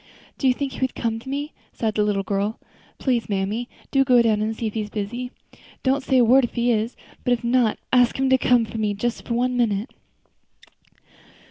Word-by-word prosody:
Do 270 Hz, -, +2 dB
you 255 Hz, -, +5 dB
think 280 Hz, 0 st, -3 dB
he -, -, -8 dB
would 260 Hz, -1 st, -1 dB
come 225 Hz, -1 st, -2 dB
to 265 Hz, -, -10 dB
me?" 285 Hz, +3 st, -3 dB, 0.2 s
sighed 220 Hz, -2 st, -1 dB
the 210 Hz, -, +1 dB
little 205 Hz, -1 st, 0 dB
girl. 200 Hz, +2 st, -2 dB, 0.4 s
"Please, 245 Hz, -5 st, 0 dB
mammy, 205 Hz, +5 st, -2 dB, 0.2 s
go 270 Hz, -3 st, +4 dB
down 215 Hz, -2 st, +2 dB
and 220 Hz, +1 st, -1 dB
see 230 Hz, -, -4 dB
if 215 Hz, -, -2 dB
he 220 Hz, -, -1 dB
is 210 Hz, -, -5 dB
busy. 225 Hz, +5 st, -4 dB, 0.5 s
Don't 270 Hz, +1 st, +2 dB
say 265 Hz, -, +2 dB
a 245 Hz, -, +6 dB
word 260 Hz, +4 st, +6 dB
if 240 Hz, -, -3 dB
he 240 Hz, 0 st, +2 dB
is; 225 Hz, +1 st, 0 dB, 0.3 s
but 245 Hz, -, +2 dB
if 240 Hz, -, -2 dB
not, 235 Hz, -2 st, +2 dB, 0.2 s
ask 245 Hz, -2 st, +4 dB
him 270 Hz, 0 st, +1 dB
to 260 Hz, -, +6 dB
come 245 Hz, -2 st, +3 dB
to 225 Hz, -, -6 dB
me 210 Hz, -1 st, 0 dB
for -, -, -16 dB
just 240 Hz, +1 st, -3 dB
one 250 Hz, +2 st, +1 dB
minute." 220 Hz, -2 st, 0 dB
235 Hz, 220 wpm, -23 LUFS, 215-255 Hz, 0.5 s, a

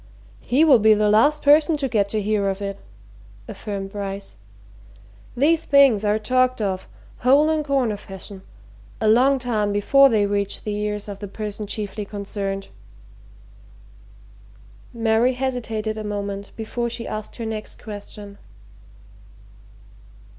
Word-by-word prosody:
"He 280 Hz, +6 st, +2 dB
will 275 Hz, -7 st, +6 dB
be 215 Hz, 0 st, +5 dB
the 210 Hz, 0 st, +2 dB
last 290 Hz, +8 st, +3 dB
person 300 Hz, +2 st, +5 dB
to 280 Hz, -2 st, -1 dB
get 205 Hz, -5 st, 0 dB
to 215 Hz, 0 st, -2 dB
hear 205 Hz, -1 st, +1 dB
of 195 Hz, 0 st, -3 dB
it," 200 Hz, -1 st, -5 dB, 0.7 s
affirmed 195 Hz, -3 st, -6 dB
Bryce. 200 Hz, -, -6 dB, 1.0 s
"These 315 Hz, +5 st, +3 dB
things 275 Hz, -7 st, +5 dB
are 210 Hz, 0 st, +2 dB
talked 255 Hz, +3 st, +1 dB
of, 190 Hz, -3 st, -2 dB, 0.3 s
hole 280 Hz, +5 st, +4 dB
and 310 Hz, -1 st, 0 dB
corner 265 Hz, -7 st, 0 dB
fashion, 195 Hz, -1 st, -10 dB, 0.6 s
a 220 Hz, -, 0 dB
long 255 Hz, +5 st, +4 dB
time 220 Hz, -5 st, -1 dB
before 275 Hz, +7 st, +5 dB
they 215 Hz, -4 st, +2 dB
reach 200 Hz, 0 st, -2 dB
the 210 Hz, -, -3 dB
ears 210 Hz, 0 st, -3 dB
of 200 Hz, -1 st, -7 dB
the 205 Hz, -, -6 dB
person 210 Hz, +1 st, -6 dB
chiefly 210 Hz, 0 st, -4 dB
concerned." 195 Hz, -1 st, -5 dB, 2.2 s
Mary 230 Hz, +1 st, +2 dB
hesitated 225 Hz, -4 st, -3 dB
a -, -, -5 dB
moment 200 Hz, -1 st, -5 dB
before 235 Hz, +2 st, -3 dB
she 230 Hz, 0 st, -5 dB
asked 215 Hz, 0 st, -6 dB
her 230 Hz, -, -5 dB
next 220 Hz, -1 st, -6 dB
question. 205 Hz, -1 st, -9 dB
215 Hz, 135 wpm, -22 LUFS, 205-250 Hz, 2.2 s, will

